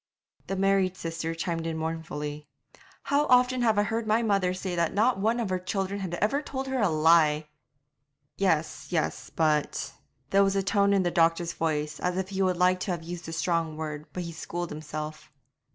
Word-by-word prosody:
The 195 - -2
married 195 -1 +2
sister 165 0 -4
chimed 165 0 -2
in 160 -1 -2
mournfully, 150 -2 -4 0.6
'How 290 +1 +2
often 250 0 +4
have 220 -3 +3
I 205 - +4
heard 225 +2 -2
my 220 +2 +3
mother 195 -4 +2
say 185 0 -3
that 170 +1 0
not 225 +1 +3
one 225 +4 +1
of 220 -5 -2
her 185 - 0
children 195 +1 -2
had 185 -3 -3
ever 215 +10 +1
told 270 -2 -4
her 265 -2 -1
a 205 - +3
lie!' 155 -1 +4 0.9
'Yes, 155 -8 0
yes, 165 -3 -1
but 155 -2 0 0.2
' 130 +2 -44
There 195 0 +5
was 195 0 +1
a 195 - +1
tone 200 0 +3
in 195 -1 +3
the 175 - 0
doctor's 170 0 +2
voice 150 -1 -2
as 180 0 -1
if 190 0 -2
he 195 -1 -2
would 185 -2 +2
like 180 +1 +3
to 185 - -2
have 170 -2 -3
used 170 0 -7
a - - -5
strong 165 -1 -1
word, 150 -1 -5
but 180 - -4
he 170 - -6
schooled 175 +1 -5
himself. 155 0 -6
175 Hz, 200 wpm, -27 LUFS, 160-195 Hz, 0.9 s, There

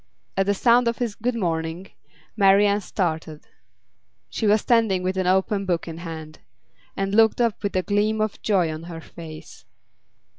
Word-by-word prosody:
At 195 0 +1
the 200 - +2
sound 240 +3 +4
of 235 - 0
his 235 -4 -2
'Good 235 +3 -2
morning,' 165 -2 -3 0.4
Marian 200 0 +4
started 160 -5 -3 0.8
she 210 - -2
was 210 +1 +4
standing 220 -6 +2
with 185 +1 -1
an 185 -1 -1
open 190 +2 +1
book 175 -2 -1
in 165 0 -7
hand 160 -2 -8 0.6
and 195 0 -1
looked 225 +1 +4
up 235 -3 +1
with 200 -2 -3
a 185 - +1
gleam 210 +2 +1
of 215 -1 -2
joy 180 -7 +1
on 155 - -7
her 170 -1 -7
face. 160 -2 -11
195 Hz, 170 wpm, -23 LUFS, 170-215 Hz, 0.8 s, sound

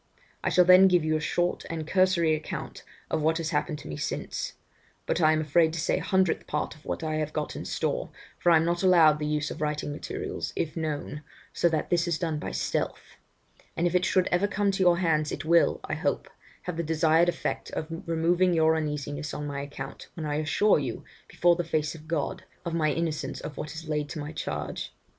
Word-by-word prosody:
I - - +1
shall 180 - +5
then 185 +1 +8
give 180 -4 +3
you 155 0 +1
a - - +1
short 175 +3 0
and 160 -2 -4
cursory 185 -2 +3
account 155 0 -5 0.3
of - - +1
what 160 +2 +2
has 165 0 -2
happened 155 -4 -1
to - - -10
me 75 - -5
since; - - -3 0.5
but 175 - 0
I 155 -1 +6
am 155 0 +2
afraid 160 +1 +3
to 165 - -3
say 160 - +1
a - - -6
hundredth 190 -3 +1
part 150 - -2
of 155 - -19
what - - -4
I 155 -1 -1
have 155 -1 -2
got 150 -1 -3
in - - -6
store, - - -2 0.3
for 175 - +3
I - - +7
am 160 0 +4
not 170 0 0
allowed 165 -5 +6
the 150 - -2
use 150 0 -1
of - - -7
writing 150 -1 -1
materials, 145 - -5
if 155 - -2
known, 150 -2 -3 0.3
so 170 - +3
that 160 -2 -2
this 175 0 +2
is 170 -2 0
done 160 -4 -2
by - - -4
stealth; - - -3 0.6
but 170 - 0
if 175 - +1
it 180 0 +3
should 185 -1 +3
ever 180 +3 +3
come 200 0 +1
to 195 - -2
your 175 -2 +5
hands, 155 -4 +1
it - - -5
will, 170 +1 +4
I - - -4
hope, - - -1 0.4
have 180 -4 -4
the - - +1
desired 160 +1 +3
effect - - -3
of - - -2 0.2
removing 170 +2 +2
your 160 0 +4
uneasiness 150 -1 -3
on 150 - -4
my 140 -1 -4
account, 140 -1 -8
when 160 - -5
I 150 0 -1
assure 155 +6 +3
you, 130 -5 -4 0.2
before 175 0 +3
the 175 - -1
face 155 -2 -1
of 160 -1 -12
God, 160 -3 -2 0.2
of 170 - -3
my 155 -2 +2
innocence 155 -4 -2
of 150 - -7
what 150 - -6
is 160 0 -8
laid 150 -1 -1
to 160 - -5
my 145 +1 -5
charge. - - -5
160 Hz, 225 wpm, -27 LUFS, 150-175 Hz, 0.6 s, then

